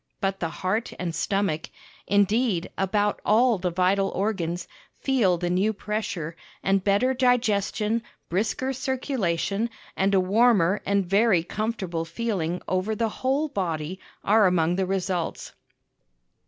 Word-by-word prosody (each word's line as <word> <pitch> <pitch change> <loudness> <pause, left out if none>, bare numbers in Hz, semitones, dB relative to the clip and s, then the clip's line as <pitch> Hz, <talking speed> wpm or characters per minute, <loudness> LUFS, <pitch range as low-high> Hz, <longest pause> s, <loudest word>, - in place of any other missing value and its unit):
But 195 0 -1
the 165 - -1
heart 185 +9 -2
and 175 -2 -3
stomach 160 -1 -1 0.4
indeed, 205 -2 +2
about 205 +2 0
all 230 0 +4
the 180 0 0
vital 185 +3 +2
organs 180 -4 -2 0.3
feel 230 -10 +2
the 175 +1 -2
new 195 +5 +2
pressure, 200 -6 -4 0.3
and 195 -1 +2
better 205 +7 +3
digestion, 230 -3 +1 0.3
brisker 220 +8 -1
circulation, 235 - -1 0.3
and 195 +1 +2
a - - +5
warmer 200 -1 +3
and 200 -1 +2
very 195 -1 +3
comfortable 190 -4 -3
feeling 175 -1 -2
over 185 +4 0
the 225 +1 0
whole 270 +7 0
body 180 - -3 0.2
are 210 0 +5
among 175 -1 +2
the 190 0 0
results. 185 -2 -2
195 Hz, 130 wpm, -25 LUFS, 180-220 Hz, 0.4 s, a